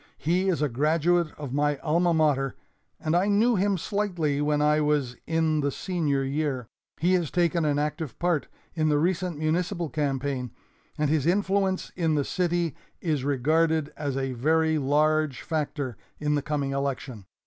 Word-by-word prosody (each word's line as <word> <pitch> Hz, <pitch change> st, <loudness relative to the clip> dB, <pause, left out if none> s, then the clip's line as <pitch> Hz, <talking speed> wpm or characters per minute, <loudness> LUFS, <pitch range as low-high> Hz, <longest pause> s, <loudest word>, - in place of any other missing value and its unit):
He 180 Hz, +5 st, +1 dB
is 165 Hz, -5 st, +1 dB
a -, -, +3 dB
graduate 160 Hz, +6 st, +2 dB
of 145 Hz, -4 st, -6 dB
my 145 Hz, 0 st, +1 dB
alma 170 Hz, +4 st, +1 dB
mater 145 Hz, -4 st, +2 dB, 0.4 s
and 155 Hz, +1 st, 0 dB
I 180 Hz, +3 st, +3 dB
knew 220 Hz, +4 st, +3 dB
him 195 Hz, 0 st, +1 dB
slightly 175 Hz, -7 st, -1 dB
when 150 Hz, 0 st, +1 dB
I 150 Hz, +1 st, +3 dB
was 145 Hz, -4 st, +1 dB
in 160 Hz, -1 st, +1 dB
the 140 Hz, -, +1 dB
senior 150 Hz, -4 st, -1 dB
year. 135 Hz, -2 st, -1 dB, 0.3 s
He 175 Hz, +4 st, +3 dB
has 175 Hz, -5 st, +1 dB
taken 170 Hz, -2 st, +1 dB
an 145 Hz, -1 st, +1 dB
active 150 Hz, -1 st, -3 dB
part 175 Hz, -4 st, 0 dB, 0.3 s
in 155 Hz, -2 st, +1 dB
the 150 Hz, -, +3 dB
recent 175 Hz, +1 st, 0 dB
municipal 170 Hz, +2 st, -1 dB
campaign, 135 Hz, -3 st, -1 dB, 0.5 s
and 150 Hz, -1 st, +1 dB
his 155 Hz, -1 st, +1 dB
influence 195 Hz, 0 st, +1 dB
in 165 Hz, -3 st, +1 dB
the 145 Hz, -2 st, +1 dB
city 175 Hz, -4 st, 0 dB, 0.2 s
is 155 Hz, -6 st, -1 dB
regarded 155 Hz, +3 st, +1 dB
as 140 Hz, -3 st, -3 dB
a 135 Hz, -1 st, -2 dB
very 160 Hz, +5 st, +2 dB
large 150 Hz, 0 st, +1 dB
factor 145 Hz, -, -3 dB, 0.2 s
in 150 Hz, 0 st, 0 dB
the 145 Hz, -, +1 dB
coming 145 Hz, -1 st, -2 dB
election. 135 Hz, -6 st, -3 dB
155 Hz, 165 wpm, -26 LUFS, 145-170 Hz, 0.5 s, a